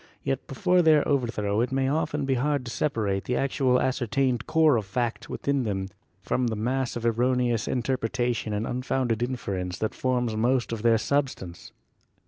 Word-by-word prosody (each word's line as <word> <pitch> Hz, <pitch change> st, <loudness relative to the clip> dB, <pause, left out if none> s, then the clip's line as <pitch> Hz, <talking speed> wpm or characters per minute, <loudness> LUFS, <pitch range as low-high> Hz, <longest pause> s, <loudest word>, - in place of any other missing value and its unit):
Yet 135 Hz, -, -2 dB
before 180 Hz, +6 st, +2 dB
their 155 Hz, -3 st, +4 dB
overthrow 115 Hz, -7 st, 0 dB
it 125 Hz, -, -1 dB
may 135 Hz, 0 st, +1 dB
often 150 Hz, 0 st, 0 dB
be 135 Hz, -, +1 dB
hard 140 Hz, +1 st, 0 dB
to 120 Hz, -, -5 dB
separate 110 Hz, -8 st, -1 dB
the 125 Hz, -, -1 dB
actual 130 Hz, -1 st, +2 dB
ascertained 130 Hz, -1 st, 0 dB
core 160 Hz, -4 st, +4 dB
of 110 Hz, -3 st, -1 dB
fact 120 Hz, +3 st, -2 dB
within 140 Hz, -1 st, -1 dB
them 95 Hz, -5 st, -2 dB, 0.3 s
from 125 Hz, -1 st, 0 dB
the 110 Hz, -, -1 dB
mass 125 Hz, +4 st, -1 dB
of 120 Hz, 0 st, -4 dB
erroneous 120 Hz, 0 st, +1 dB
interpretation 120 Hz, -2 st, -1 dB
and 105 Hz, +1 st, -1 dB
un 125 Hz, +2 st, -3 dB
founded 125 Hz, -3 st, -1 dB
inference 100 Hz, -8 st, -3 dB
that 110 Hz, -, -2 dB
forms 125 Hz, -3 st, 0 dB
most 120 Hz, +3 st, +1 dB
of 115 Hz, -2 st, -3 dB
their 115 Hz, 0 st, +4 dB
substance." 120 Hz, -9 st, -2 dB
125 Hz, 170 wpm, -26 LUFS, 115-135 Hz, 0.3 s, their